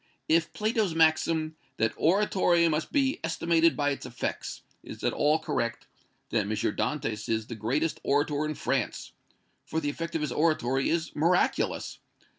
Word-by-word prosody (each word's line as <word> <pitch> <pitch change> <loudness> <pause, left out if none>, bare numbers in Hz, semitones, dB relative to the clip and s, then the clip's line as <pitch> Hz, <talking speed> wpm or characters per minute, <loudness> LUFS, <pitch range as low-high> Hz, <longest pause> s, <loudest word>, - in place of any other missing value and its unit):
If 165 0 +2
Plato's 215 -5 0
maxim, 160 0 +2 0.2
'that 110 0 +1
oratory 175 -2 +3
must 155 0 -1
be 275 -3 +1
estimated 165 0 +2
by 145 -1 +1
its 140 - -4
effects,' 125 -1 -5 0.2
is - - -10
at - - +1
all 150 +2 +3
correct, 120 -7 -3 0.5
then 105 -2 0
is 110 - -1
M. - - 0
Dantès 110 -3 -2
the - - -6
greatest 130 +9 -1
orator 145 +1 +1
in 155 0 -3
France, - - -2 0.5
for 160 - -2
the 145 -2 -1
effect 165 +2 -5
of 160 - 0
his 150 -4 -2
oratory 135 -4 +1
is 165 0 -1
miraculous. 170 +4 +1
155 Hz, 155 wpm, -28 LUFS, 130-165 Hz, 0.5 s, oratory